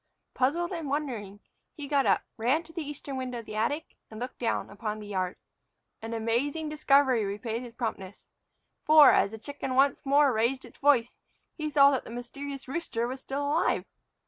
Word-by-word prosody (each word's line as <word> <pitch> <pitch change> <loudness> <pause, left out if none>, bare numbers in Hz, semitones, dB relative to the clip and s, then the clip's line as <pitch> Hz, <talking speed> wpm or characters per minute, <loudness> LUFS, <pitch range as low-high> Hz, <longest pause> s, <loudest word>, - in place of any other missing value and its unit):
Puzzled 325 +8 0
and 330 -5 -4
wondering, 235 -9 -3 0.3
he 290 -3 -7
got 280 -1 +2
up, - - +3
ran 255 +9 +1
to 325 0 -16
the 335 - -4
eastern 290 -2 -6
window 255 -1 -4
of 230 - -7
the 215 - -8
attic, 290 +9 -2
and 215 - -9
looked 250 +1 -6
down 230 -4 -1
upon 210 +1 -4
the 210 - -9
yard. 185 -2 -2 0.7
An 225 +1 -5
amazing 270 +8 -1
discovery 275 -5 +3
repaid 220 +4 -3
his 240 -2 -10
promptness. 205 -5 -5 0.6
For, 305 -1 +8
as - - +3
the 220 - -8
chicken 270 +2 -5
once 275 +1 +3
more 280 -1 +4
raised 235 +4 0
its - - -16
voice, 265 -5 +3 0.4
he 310 -2 -3
saw 280 -1 +6
that 265 - -1
the - - -11
mysterious 270 +4 -7
rooster 260 -5 -2
was 260 +1 -6
still 280 +2 -3
alive! 310 +4 +1
260 Hz, 185 wpm, -28 LUFS, 230-290 Hz, 0.7 s, For